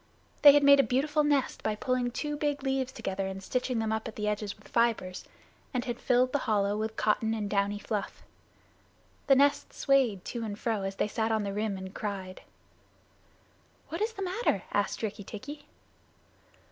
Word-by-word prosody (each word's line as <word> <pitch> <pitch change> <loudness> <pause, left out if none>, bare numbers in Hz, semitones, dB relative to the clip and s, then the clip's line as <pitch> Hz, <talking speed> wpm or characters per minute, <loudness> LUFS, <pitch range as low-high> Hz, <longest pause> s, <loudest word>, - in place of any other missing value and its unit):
They 290 -1 +10
had 290 0 +4
made 280 0 +8
a - - +7
beautiful 295 +4 +1
nest 290 -3 +1
by 215 - -1
pulling 250 +2 0
two 295 +4 -3
big 290 -2 -1
leaves 265 -1 0
together 195 -5 -3
and 190 0 -6
stitching 250 +3 -1
them 220 -1 0
up 220 0 -2
the 210 0 -2
edges 210 -1 -2
with - - -18
fibers, 230 -6 0 0.5
and 250 +1 0
had 240 -1 -4
filled 255 0 +2
the 285 - +1
hollow 205 -1 +2
with 220 +1 -3
cotton 220 +1 +1
and 210 -2 -2
downy 200 0 0
fluff. 210 0 -4 1.0
The 270 - +7
nest 285 +1 +2
swayed 260 -9 +2
to 235 -2 -4
and 205 -2 -4
fro, 220 -2 -1
as 195 0 -3
they - - 0
sat 220 +1 -1
on 220 -1 +1
the 200 -1 -3
rim 210 -1 -1
and 190 0 -8
cried. 190 -3 -5 1.5
"What 330 - -4
is 445 +1 0
the 395 - -5
matter?" 370 - 0
asked 205 +2 0
Rikki 210 -1 -3
tikki. 285 +9 -9
225 Hz, 185 wpm, -29 LUFS, 205-270 Hz, 1.5 s, They